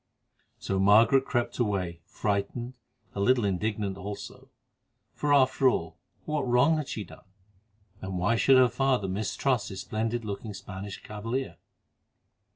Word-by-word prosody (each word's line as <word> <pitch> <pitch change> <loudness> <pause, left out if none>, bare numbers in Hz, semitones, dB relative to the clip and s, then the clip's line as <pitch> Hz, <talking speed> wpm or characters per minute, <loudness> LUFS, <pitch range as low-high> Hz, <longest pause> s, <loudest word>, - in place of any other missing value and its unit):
So 95 - -2
Margaret 115 +7 +5
crept 120 -1 -2
away 95 -7 -1
frightened, 110 +4 -2 0.4
a - - -5
little 120 +2 +3
indignant 100 0 -1
also, 100 +1 -8 0.6
for 150 - -1
after 130 -1 +5
all, 85 -8 -3 0.3
what 150 -1 -1
wrong 125 +6 +4
had 150 -3 -3
she 105 - -4
done? - - -15 0.7
And 95 -1 -4
why 100 +6 +2
should 130 +3 +5
her 130 -1 +7
father 130 -4 0
mistrust 110 +5 -1
this 95 - -6
splendid 115 +1 -2
looking 105 0 -5
Spanish 95 +1 -8
cavalier? 115 +5 -4
110 Hz, 135 wpm, -28 LUFS, 100-130 Hz, 0.7 s, her